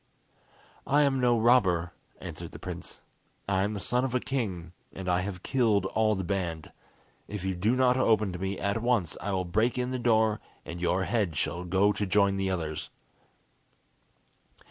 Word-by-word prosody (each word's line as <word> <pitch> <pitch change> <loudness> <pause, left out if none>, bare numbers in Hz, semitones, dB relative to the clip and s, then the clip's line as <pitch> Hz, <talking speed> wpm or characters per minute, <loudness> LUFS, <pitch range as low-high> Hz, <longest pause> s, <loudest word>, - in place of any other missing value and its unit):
"I 145 +2 +4
am 135 -2 +2
no 120 -2 +3
robber," 95 -8 +3 0.3
answered - - -8
the - - -7
prince. - - -7 0.5
"I 95 -1 +1
am 105 +2 -1
the - - -3
son 125 +6 0
of 130 -1 -1
a - - +3
king, 95 -12 -3 0.2
and 95 -1 -7
I 90 0 +2
have 90 -1 -5
killed 110 -7 +2
all 110 +2 +1
the 95 - -3
band. 85 -4 -3 0.6
If 105 -3 -5
you 95 - 0
do 105 +7 +1
not 125 -1 +3
open 110 -6 +2
to 90 - -6
me 95 +1 -2
at 100 +3 -1
once 115 -9 +1
I 100 - -2
will 95 -1 -1
break 110 +8 +1
in 125 0 -1
the 130 - -2
door, 110 -3 +3 0.3
and 85 - -7
your 90 +2 +1
head 95 -7 0
shall 85 +4 -1
go 95 +3 +3
to 105 - -2
join 100 0 +3
the 95 0 0
others." 80 -4 -3
100 Hz, 185 wpm, -28 LUFS, 90-120 Hz, 0.6 s, I